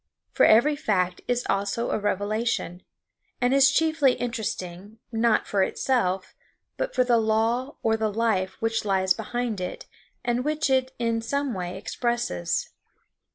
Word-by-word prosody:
For - - +4
every 240 +7 +5
fact 185 -8 0
is 245 0 0
also 200 +4 -1
a - - 0
revelation, 205 -2 -1 0.6
and 245 +1 +2
is 275 0 +6
chiefly 315 -2 +3
interesting, 210 -4 -5
not 230 0 +2
for 200 - 0
itself, 190 -3 0 0.4
but - - -3
for 255 - +4
the 240 -2 +3
law 225 +5 0
or 225 -1 +3
the 220 -1 -1
life 205 -4 0
which 225 0 0
lies 190 -2 +2
behind 230 -2 -3
it 180 - -5 0.4
and 240 +1 0
which 300 -1 0
it 260 0 +2
in 230 -1 0
some 280 +3 -1
way 180 -1 -4
expresses. 235 - -2
225 Hz, 145 wpm, -25 LUFS, 200-245 Hz, 0.6 s, is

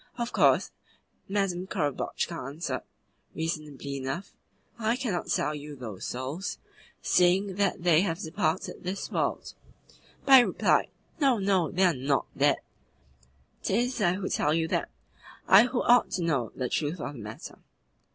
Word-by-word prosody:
Of 235 0 -3
course, - - +3 0.6
Madame 190 -2 -1
Korobotchka 150 -2 -2
answered, 140 -2 -4 0.5
reasonably 150 -4 -4
enough: 135 +8 -4 0.5
'I 225 +1 +1
cannot 230 -9 -3
sell 150 - +1
you 150 0 -7
those 110 -8 -7
souls, 135 +10 -4 0.5
seeing 185 +2 +3
that 200 -3 0
they 170 -2 +5
have 165 -4 -1
departed 170 -2 -2
this 185 +2 -4
world;' - - -2 0.7
but 270 -1 +9
he - - +6
replied: - - +2 0.3
'No, 270 -5 +4
no! 190 -5 +1
They 185 +6 +1
are 180 -2 +5
NOT 135 +1 0
dead. - - +3 1.0
'Tis 240 +4 0
I 175 -3 +3
who 190 0 -3
tell 150 +1 +1
you 165 -1 +1
that - - -1 0.6
I 200 +5 +8
who 245 0 -1
ought 245 0 +5
to 180 - -1
know 135 -9 0
the 130 - -2
truth 155 +6 -2
of 145 - -5
the 135 - -10
matter. 105 +1 -9
175 Hz, 150 wpm, -28 LUFS, 145-200 Hz, 1.0 s, but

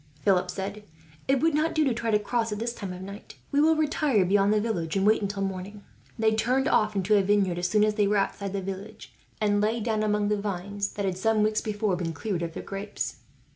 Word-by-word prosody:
Philip 185 -1 +2
said. 200 +3 -5 0.4
"It 265 -1 +2
would 325 -1 +3
not 310 +2 +1
do 310 - +3
to 270 -4 +2
try 230 0 -2
to 210 - +4
cross, 225 +2 -1
at 210 - -2
this 235 +2 -2
time 200 -5 -6
of 180 +1 -7
night. 200 +2 -10 0.2
We 285 - +3
will 320 +1 +5
retire 300 -9 +2
beyond 200 +2 +3
the 215 - +3
village, 200 -7 -2
and 195 - +1
wait 215 +1 +4
until 200 -1 -2
morning." 195 +2 -5 0.3
They 220 -1 +3
turned 250 +5 +1
off 215 -1 +2
into 195 +2 +2
a 200 - +5
vineyard, 190 -3 +1
as 175 - 0
soon 210 +3 +3
as 215 0 +2
they 210 -1 +2
were 205 +1 +2
outside 200 0 -1
the 195 -1 -2
village; 195 +3 -7 0.3
and 205 -1 +2
lay 220 +3 +1
down 220 -1 -1
among 210 -1 +1
the 210 -1 0
vines 200 0 -3
that 200 - -3
had, 185 -1 -2
some 220 +1 +2
weeks 215 0 +1
before, 210 -2 -1
been 170 -2 -3
cleared 180 +2 -3
of 165 -1 -3
their - - -5
grapes. 200 +1 -5
210 Hz, 245 wpm, -27 LUFS, 195-220 Hz, 0.4 s, will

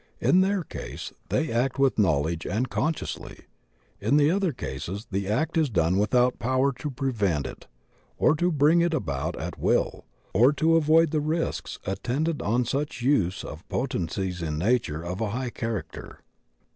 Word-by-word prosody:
In 185 - +4
their 195 -1 +1
case - - -7 0.2
they 160 - 0
act 120 +3 0
with 135 -4 +2
knowledge 80 -3 +1
and 115 +8 -1
consciously; 155 0 -3 0.6
in 115 +9 +2
the 150 +1 +4
other 190 -2 +1
cases 95 - -5
the 100 0 -1
act 155 +10 +1
is 155 -3 +2
done 90 -2 +2
without 125 +4 +2
power 130 +3 +2
to 150 - -3
prevent 110 - -1
it, - - -8 0.5
or 155 - +4
to 175 +3 +1
bring 155 +3 +4
it 170 -1 +2
about 75 - -2
at 85 +1 -5
will, - - +1 0.3
or 125 +9 +5
to 160 +3 +3
avoid 160 0 +4
the 155 -2 +1
risks 160 +3 -2
attendant 140 - -1
on 120 +4 +1
such 140 0 -2
use 100 -9 +2
of 80 +3 -9
potencies 95 -6 -2
in 75 -2 -2
nature 90 -5 0
of 90 +4 -4
a 110 - 0
high 125 +3 -3
character. 115 -4 -5
125 Hz, 165 wpm, -26 LUFS, 95-150 Hz, 0.6 s, or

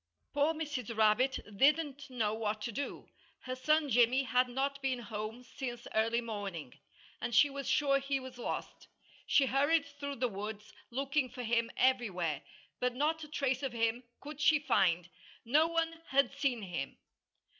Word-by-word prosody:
Poor 290 +2 +3
Mrs. 270 -8 -4
Rabbit 220 +5 +3 0.2
didn't 285 +3 +2
know 225 -5 0
what 215 -1 -2
to 235 - -3
do. 280 +6 -5 0.3
Her 255 0 -4
son 305 +3 +2
Jimmy 245 +1 +4
had 250 0 +2
not 275 +2 -2
been 265 -1 0
home 220 +1 -6
since 245 -2 -6
early 230 +2 +2
morning; 200 - -5 0.5
and 235 - -2
she 290 +3 +6
was 275 -1 -4
sure 275 -2 +3
he 275 0 -1
was 260 -1 -10
lost. - - -5 0.4
She 275 - +5
hurried 285 +5 +3
through 285 0 -6
the 250 0 0
woods, 210 0 -6 0.2
looking 275 +2 0
for 250 0 -7
him 230 0 +1
everywhere. 190 - +1 0.4
But 250 -1 0
not 310 +4 0
a - - -7
trace 275 -3 -1
of 270 -3 -3
him 230 +1 0 0.2
could 300 0 -8
she 310 0 +6
find. 190 - +2 0.4
No 300 +7 +4
one 330 0 -1
had 275 +1 +3
seen 275 -5 -1
him. 170 -8 -4
255 Hz, 165 wpm, -33 LUFS, 225-280 Hz, 0.5 s, she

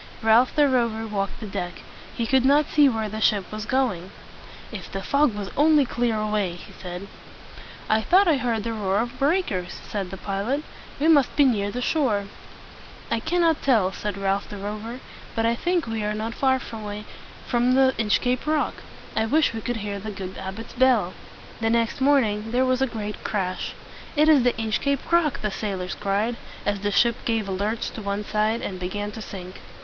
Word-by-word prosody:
Ralph 225 +3 +5
the 295 -2 +5
Rover 235 -4 +1
walked 200 -3 -3
the 225 - -6
deck. 180 -3 -4 0.4
He 235 - -1
could 260 +2 +3
not 285 +3 +5
see 295 -2 +5
where 220 -3 -1
the 215 +1 -5
ship 205 -3 +2
was 215 +1 -5
going. 230 -10 0 0.6
"If - - -8
the - - -4
fog 280 -6 +2
would 205 -2 -5
only 300 -1 +5
clear 235 -3 0
away!" 210 -4 0
he 175 - -12
said. 180 +1 -7 0.8
"I 215 +1 +3
thought 375 - +4
I 315 -4 +4
heard 235 -4 -1
the 230 +1 -2
roar 200 -3 0
of 240 +3 -2
breakers," 275 - 0
said 195 -3 -3
the 195 - -7
pilot. 205 +10 -2 0.4
"We 300 - +2
must 290 -5 +4
be 290 - +5
near 205 -6 +2
the 245 +4 -3
shore." 245 -11 +1 0.9
"I - - +2
cannot 330 +3 +2
tell," 220 -9 +3
said 205 +1 -4
Ralph 195 0 -1
the 205 - -7
Rover; 215 +5 -5 0.3
"but 225 -1 +1
I 230 - +3
think 350 +7 0
we 225 -1 -3
are 210 0 -1
not 220 +2 -3
far 265 0 +2
from 225 -4 -7 0.9
the 265 0 +5
Inchcape 245 +5 +1
Rock. 305 -1 +1 0.4
I 220 - +1
wish 300 +1 +3
we 225 - -4
could 240 +2 -2
hear 200 -1 -3
the 215 +2 -6
good 190 -2 -6
abbot's 195 +4 -7
bell." 240 -8 +3 0.5
The 225 0 +1
next 230 +3 +1
moment 225 -6 +2
there 255 +1 +3
was 255 0 +1
a 265 - +3
great 210 -3 -5
crash. 185 -4 -2 0.4
"It 305 +1 +4
is 305 -4 +7
the 245 0 +3
Inchcape 235 +7 -1
Rock!" 335 -4 +3
the 210 - 0
sailors 190 -2 -3
cried, 210 +4 -1 0.3
as 205 -1 0
the 205 +1 -1
ship 235 +4 +3
gave 225 -3 0
a - - -3
lurch 205 +4 -2
to 225 - -7
one 200 0 -2
side, 215 +2 0
and 185 -2 -4
began 205 +3 -3
to 220 - -8
sink. 185 -3 -8
225 Hz, 195 wpm, -24 LUFS, 205-260 Hz, 0.9 s, is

